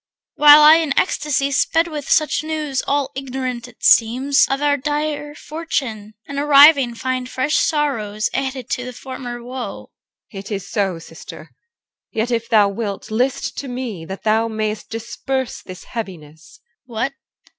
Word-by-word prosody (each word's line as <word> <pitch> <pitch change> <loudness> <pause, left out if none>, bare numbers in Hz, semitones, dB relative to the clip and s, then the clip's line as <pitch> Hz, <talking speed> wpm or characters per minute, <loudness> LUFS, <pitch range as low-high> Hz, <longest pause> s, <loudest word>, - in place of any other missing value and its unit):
While 295 0 +8
I 310 +2 +9
in 315 -4 -1
ecstasy 285 -5 +1
Sped 325 +4 +2
with 300 -4 -6
such 310 -1 +2
news, 305 -4 -2
all 285 -1 0
ignorant, 255 -2 -4
it 245 - -19
seems, 255 +5 +4
Of 270 - 0
our 290 0 +2
dire 295 +1 -3
fortune; 260 -10 -4
and, 280 0 -4
arriving, 285 -3 +6
find 255 +1 -3
Fresh 275 +5 0
sorrows 220 -9 0
added 265 -2 -3
to 250 - -1
the 250 0 -7
former 245 -2 -7
woe. 250 +1 -7 0.4
EL. 195 - -6
It 195 - -10
is 200 -1 -4
so, 195 -5 -1
sister; 165 - -12 0.6
yet 225 +3 -2
if 230 -1 -1
thou 210 -3 +5
wilt 200 +1 -5
list 255 +5 -1
To 280 - -6
me, 245 -8 -5
thou 215 +5 0
mayest 215 -1 -3
disperse 235 +3 -4
this 185 0 -11
heaviness. 165 - -9 0.3
CHR. - - -18
What? 250 +5 -2
255 Hz, 155 wpm, -20 LUFS, 220-285 Hz, 0.6 s, I